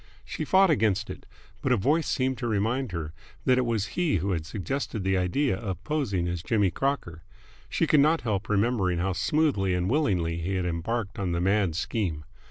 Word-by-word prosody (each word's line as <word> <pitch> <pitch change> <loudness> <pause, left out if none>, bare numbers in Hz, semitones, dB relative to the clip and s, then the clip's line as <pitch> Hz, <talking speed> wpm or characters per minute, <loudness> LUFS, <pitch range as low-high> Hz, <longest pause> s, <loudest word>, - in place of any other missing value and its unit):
She 155 - -4
fought 190 +2 +5
against 105 -6 +1
it, - - -10 0.3
but 130 - 0
a 125 - +4
voice 150 - +1
seemed 130 -1 0
to 120 - -2
remind 115 +3 0
her 80 -3 -4 0.3
that 130 0 +4
it 125 - 0
was 110 -4 0
he 175 - +1
who 95 +2 0
had 80 -3 -2
suggested 110 +1 -3
the 95 0 +1
idea 95 +7 +1
of 95 -2 -5
posing 110 - -1
as 85 -1 -3
Jimmy 100 0 +1
Crocker. 125 - -2 0.5
She - - +1
could 150 - +4
not 155 +3 +4
help 105 -3 -2
remembering 100 -4 +1
how 95 +2 0
smoothly 100 - +1
and 90 +3 0
willingly 90 - +1
he 95 +4 -2
had 90 -1 -1
embarked 100 +5 -3
on 95 -3 -1
the 85 - 0
mad 95 -2 +1
scheme. 85 -5 -2
100 Hz, 195 wpm, -27 LUFS, 90-130 Hz, 0.5 s, fought